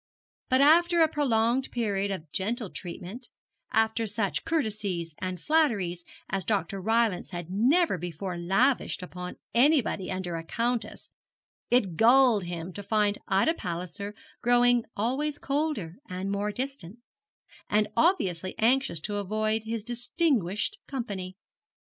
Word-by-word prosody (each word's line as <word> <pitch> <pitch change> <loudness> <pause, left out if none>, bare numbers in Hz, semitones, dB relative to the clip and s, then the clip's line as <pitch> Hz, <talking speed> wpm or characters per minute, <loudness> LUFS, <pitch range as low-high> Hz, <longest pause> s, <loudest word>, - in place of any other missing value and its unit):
But 260 +1 +4
after 340 +3 +5
a - - +5
prolonged 255 -4 +1
period 200 -4 -1
of 165 -6 -5
gentle 215 - -2
treatment, 190 +7 -8 0.4
after 225 0 +2
such 205 -1 -1
courtesies 205 - -2
and 185 -1 -4
flatteries 210 - +1 0.2
as 195 -1 -2
Dr. 195 -2 -1
Rylance 225 -2 +1
had 175 -1 -6
never 250 - +3
before 175 +2 -5
lavished 195 +7 +1
upon 180 0 -7 0.2
anybody 245 -7 +3
under 185 -2 -3
a 165 - -6
countess, 235 +6 -2 0.6
it 195 -9 +2
galled 235 -4 +5
him 175 +1 -5
to 205 - -6
find 210 0 +1
Ida 195 +12 +3
Palliser 180 - -5 0.3
growing 245 0 +4
always 275 +8 0
colder 275 - -2
and 185 +2 -3
more 205 +1 -1
distant, 245 -5 -5 0.7
and 210 0 +3
obviously 190 - +1
anxious 250 -5 +2
to 205 +5 -3
avoid 215 +2 -1
his 225 -1 -3
distinguished 240 - 0
company. 200 -8 -5
215 Hz, 125 wpm, -28 LUFS, 185-245 Hz, 0.7 s, after